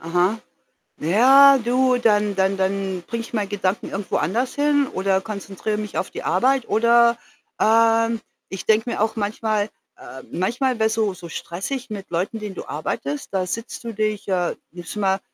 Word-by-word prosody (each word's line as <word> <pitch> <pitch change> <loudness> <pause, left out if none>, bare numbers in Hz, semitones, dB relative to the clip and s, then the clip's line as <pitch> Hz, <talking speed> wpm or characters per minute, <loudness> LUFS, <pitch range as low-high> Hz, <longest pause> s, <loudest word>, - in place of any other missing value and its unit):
Aha. 175 +6 +1 0.6
Na 155 - -5
ja, 270 +8 +7
du, 250 +1 +2
dann 210 -4 +2
dann 190 0 +1
dann 190 -1 -1
bringe 230 0 -3
ich 230 - -11
meine 210 -3 -1
Gedanken 195 -1 -2
irgendwo 195 0 -2
anders 230 - -1
hin 285 -1 +2
oder 190 0 0
konzentriere 205 0 -4
mich 210 -2 -5
auf - - -2
die - - -7
Arbeit, 260 +5 +2
oder, 235 +1 +4 0.4
ähm, 230 0 +3 0.3
ich 190 - -6
denke 220 +2 +2
mir 225 - -2
auch 220 +1 +1
manchmal, 215 0 -1 0.3
äh 130 - -10
manchmal 240 +7 0
wäre 220 - +4
es 220 - -1
so 215 -3 0
so 175 -2 -10
stressig 240 +13 -5
mit 200 -3 -7
Leuten, 185 +6 -2
denen 210 -2 -6
du - - -7
arbeitest. 145 -1 -4
Da 185 -1 0
sitzt 230 +6 -5
du 230 -1 -5
dich 215 -1 -2
äh, 180 -3 0 0.2
nimmst 175 +3 -9
du - - -4
mal, 195 -1 +1
215 Hz, 185 wpm, -22 LUFS, 190-235 Hz, 0.6 s, ja